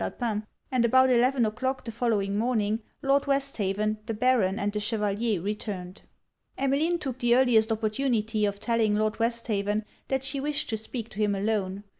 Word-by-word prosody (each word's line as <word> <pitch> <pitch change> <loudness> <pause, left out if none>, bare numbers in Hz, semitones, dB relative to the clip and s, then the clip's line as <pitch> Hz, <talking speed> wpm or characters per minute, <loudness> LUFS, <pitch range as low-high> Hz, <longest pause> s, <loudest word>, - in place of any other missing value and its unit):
Alpin; 215 -3 -3 0.2
and 255 -2 +2
about 260 +2 +5
eleven 250 0 +3
o'clock 260 +5 -2
the 230 - -4
following 215 -4 0
morning, 220 -1 +1 0.2
Lord 280 +1 +2
Westhaven, 215 -7 0
the 225 - -2
Baron, 215 -5 +2
and 205 -2 -1
the 210 - -1
Chevalier, 210 -1 0
returned. 190 -1 -5 0.6
Emmeline 285 +6 +1
took 265 -6 -5
the 240 -1 +3
earliest 240 -3 +4
opportunity 220 -1 0
of 200 0 -4
telling 225 -2 +1
Lord 215 +1 0
Westhaven 215 -3 0 0.2
that 265 -1 -1
she 270 +1 -2
wished 295 +2 -1
to 220 - -1
speak 225 +1 -6
to 205 - -10
him 205 -1 +2
alone. 200 -1 -1
225 Hz, 165 wpm, -27 LUFS, 210-255 Hz, 0.6 s, about